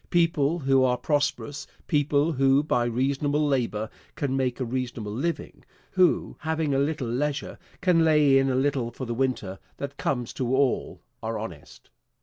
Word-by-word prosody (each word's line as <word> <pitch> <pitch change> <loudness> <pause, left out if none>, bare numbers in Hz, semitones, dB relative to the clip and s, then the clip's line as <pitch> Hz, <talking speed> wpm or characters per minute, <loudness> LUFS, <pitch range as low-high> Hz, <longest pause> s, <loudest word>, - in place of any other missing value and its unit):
People 165 -3 +2
who 135 -4 +3
are 125 -1 +2
prosperous, 145 0 -1 0.2
people 145 +1 +2
who 135 0 +3
by 125 -5 +1
reasonable 140 +5 0
labor 115 -6 0 0.3
can 135 -2 -1
make 130 -2 -1
a 130 - -1
reasonable 120 -3 -3
living, 165 +9 -3 0.3
who, 185 -3 +2
having 160 -2 -1
a 135 - +2
little 145 -2 -1
leisure 140 +5 -2 0.2
can 180 -3 +4
lay 150 -4 +5
in 135 0 +2
a 130 - +1
little 130 -2 +1
for 125 +3 -7
the 120 - -3
winter 115 -7 -2 0.2
that 140 0 -6
comes 125 -4 -2
to 130 0 0
all, 135 -2 0 0.2
are - - -3
honest. - - -9
135 Hz, 160 wpm, -26 LUFS, 125-150 Hz, 0.3 s, lay